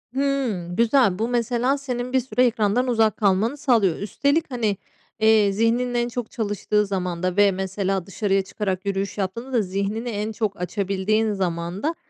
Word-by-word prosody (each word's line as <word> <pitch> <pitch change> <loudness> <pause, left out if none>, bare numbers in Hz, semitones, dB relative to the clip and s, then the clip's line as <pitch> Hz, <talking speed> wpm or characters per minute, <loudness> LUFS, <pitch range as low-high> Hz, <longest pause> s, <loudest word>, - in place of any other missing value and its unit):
Hıı, 270 -10 0
güzel. 230 -3 +3
Bu 225 - 0
mesela 245 +2 +1
senin 250 -2 -4
bir 260 - +4
süre 255 0 +1
ekrandan 230 +1 +1
uzak 225 -4 +2
kalmanı 210 +6 +1
sağlıyor. 230 - +2
Üstelik 280 - 0
hani, 220 -5 0 0.4
eee, 220 -2 +4
zihninin 230 +4 +1
en 240 0 +1
çok 240 -1 -5
çalıştığı 210 -2 0
zamanda 185 -1 -2
ve 205 -1 +6
mesela 190 0 -2
dışarıya 195 0 0
çıkarak 190 -1 -4
yürüyüş 195 0 -2
yaptığında 230 +7 -4
da 235 - +3
zihnini 200 +5 -3
en 215 0 -3
çok 210 -3 -3
açabildiğin 200 +3 0
zamanda 185 - -2
215 Hz, 155 wpm, -23 LUFS, 195-245 Hz, 0.4 s, ve